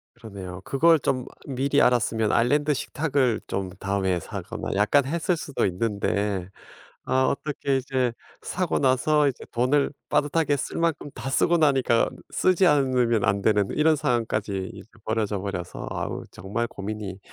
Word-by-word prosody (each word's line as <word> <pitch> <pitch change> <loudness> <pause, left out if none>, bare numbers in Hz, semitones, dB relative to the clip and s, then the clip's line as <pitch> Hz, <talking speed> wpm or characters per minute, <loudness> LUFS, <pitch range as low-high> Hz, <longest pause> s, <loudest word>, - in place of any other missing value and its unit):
그러네요. 100 -6 -8
그걸 160 +3 +4
좀 130 -1 -1 0.2
미리 140 +2 +1
알았으면 115 -3 +2
아일랜드 145 +5 +2
식탁을 135 -5 0
좀 95 -1 -3
다음에 95 -2 0
사거나 - - -6
약간 105 +8 +3
했을 170 +4 0
수도 145 -3 -2
있는데 100 -1 -1 0.6
아 130 0 +2
어떻게 140 0 -1
이제 130 -2 -1 0.3
사고 180 -3 -1
나서 140 +3 +3
이제 135 - -3
돈을 130 +4 +2 0.2
빠듯하게 145 0 +1
쓸 135 - -4
만큼 165 -3 -1
다 135 - -5
쓰고 170 +5 +3
나니까 135 -7 +3 0.2
쓰지 185 0 +3
않으면 130 - +3
안 100 0 +1
되는 105 -1 +3
이런 155 +1 +3
상황까지 110 -8 -1
이제 - - -12 0.2
벌어져 110 -2 -1
버려서 95 -3 -5
아 - - -2 0.2
정말 110 +5 -3
고민이 100 -2 -6
125 Hz, 315 characters per minute, -25 LUFS, 105-145 Hz, 0.6 s, 그걸